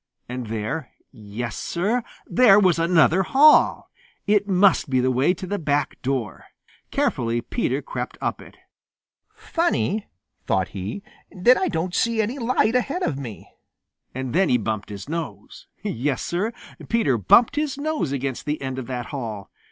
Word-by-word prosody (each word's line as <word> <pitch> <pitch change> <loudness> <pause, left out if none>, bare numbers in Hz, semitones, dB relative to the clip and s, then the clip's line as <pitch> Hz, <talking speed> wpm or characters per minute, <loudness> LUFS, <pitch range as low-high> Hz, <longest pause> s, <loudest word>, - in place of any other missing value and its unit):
And 125 -1 -5
there 115 +7 -4 0.2
yes, 110 +2 -6
Sir, 205 +8 -1 0.2
there 230 -5 +6
was 185 -4 +3
another 165 +1 +4
hall! 285 +10 +4 0.3
It 205 -1 +2
must 190 -4 +3
be 130 -1 +2
the 130 +1 +2
way 130 +7 +3
to 185 - -7
the 205 +2 -3
back 145 -3 -1
door. 130 -4 -3 0.4
Carefully 115 0 0
Peter 125 - -2
crept - - -5
up - - -3
it. - - -15 0.8
"Funny," 325 - -1 0.4
thought 95 -1 +1
he, 100 - -6 0.3
"that 215 +8 +4
I 375 - 0
don't 175 - -2
see 230 +3 +1
any 230 +6 -1
light 230 -2 +1
ahead 275 +9 0
of 140 - -1
me." 120 -7 -8 0.7
And 130 -2 -4
then 190 +1 +3
he 125 - +4
bumped 110 -2 -3
his 100 +2 -8
nose. 145 - -6 0.2
Yes, 135 +3 -2
Sir, 195 +6 -1 0.4
Peter 145 - +2
bumped 230 - +5
his 295 -2 -1
nose 295 - -2
against 135 0 -3
the 150 +1 -1
end 130 -1 -4
of 125 - -7
that 125 -2 -4
hall. 110 -7 -5
155 Hz, 160 wpm, -23 LUFS, -, 0.8 s, there